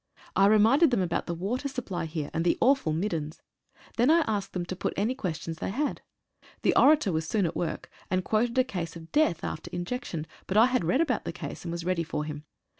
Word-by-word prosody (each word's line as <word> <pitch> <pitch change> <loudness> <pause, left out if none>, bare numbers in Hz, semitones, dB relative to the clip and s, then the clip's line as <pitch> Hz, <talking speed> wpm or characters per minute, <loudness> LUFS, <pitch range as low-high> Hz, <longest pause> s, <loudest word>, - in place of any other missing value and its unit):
I 195 - +5
reminded 225 +10 +5
them 235 -7 +1
about 170 -1 -2
the 170 - -2
water 225 +11 -2
supply 240 -11 -4
here, 155 -2 -4
and 165 - 0
the 175 - +2
awful 265 - +3
"middens." 160 -2 -3 0.5
Then 240 +4 +4
I 335 +2 +6
asked 210 -9 -2
them 180 -1 -2
to 185 - -5
put - - -3
any 215 +6 +1
questions 165 - -4
they - - -2
had. 280 +9 -2 0.6
The - - +3
orator 295 -8 +5
was 160 -1 -1
soon 205 0 +1
at 165 - -2
work, 170 - -3 0.2
and 185 0 0
quoted 230 +3 +1
a 255 - +6
case 180 -10 -5
of 165 -1 -11
death 295 - +2
after 155 - -5
injection, 175 -3 -4 0.2
but 195 - 0
I 225 - +8
had 255 -8 +1
read 180 - +2
about 265 -9 0
that - - -3
case, - - -7
and 170 - -4
was 170 0 -4
ready 180 -2 +1
for 150 -2 -3
him. 150 0 -7
190 Hz, 225 wpm, -28 LUFS, 165-250 Hz, 0.6 s, I